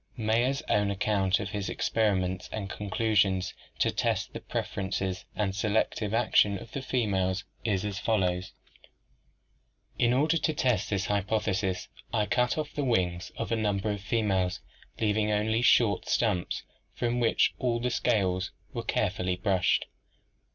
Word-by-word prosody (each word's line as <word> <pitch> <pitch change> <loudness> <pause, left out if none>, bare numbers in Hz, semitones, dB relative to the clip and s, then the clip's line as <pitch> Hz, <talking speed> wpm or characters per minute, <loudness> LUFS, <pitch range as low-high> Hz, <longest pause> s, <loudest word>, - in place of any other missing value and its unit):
Mayer's 120 +5 +1
own 105 -1 +2
account 100 -1 +1
of 100 -1 -4
his 100 -4 -3
experiments 95 -2 0
and 100 -3 -4
conclusions 100 -2 +1 0.2
to - - +2
test - - -1
the - - -5
pref - - -4
erences 95 -2 -2
and 95 -2 -1
selective 105 0 0
action 110 -3 +3
of 110 - -11
the 135 - -4
females 100 -7 0 0.2
is 105 -3 0
as 100 -2 -3
follows: 95 -4 0 1.5
"'In 120 - +4
order 150 +6 +3
to 155 0 0
test 125 -8 +1
this 100 -2 0
hypothesis 100 -2 0 0.2
I 110 -3 +1
cut 125 +5 +1
off 155 - -3
the 145 - -2
wings 90 -8 0
of - - -3
a - - +3
number 105 -1 0
of 100 -1 -4
females, 95 -3 0 0.4
leaving 105 0 +1
only 110 +2 +1
short 115 -6 +4
stumps, 105 -7 0 0.3
from 120 0 0
which 115 -2 +3
all 120 -2 +1
the 125 +1 -1
scales 95 -5 +1 0.2
were - - -2
care - - +1
fully 90 -1 -1
brushed. 90 -1 +2
105 Hz, 150 wpm, -29 LUFS, 95-115 Hz, 1.5 s, In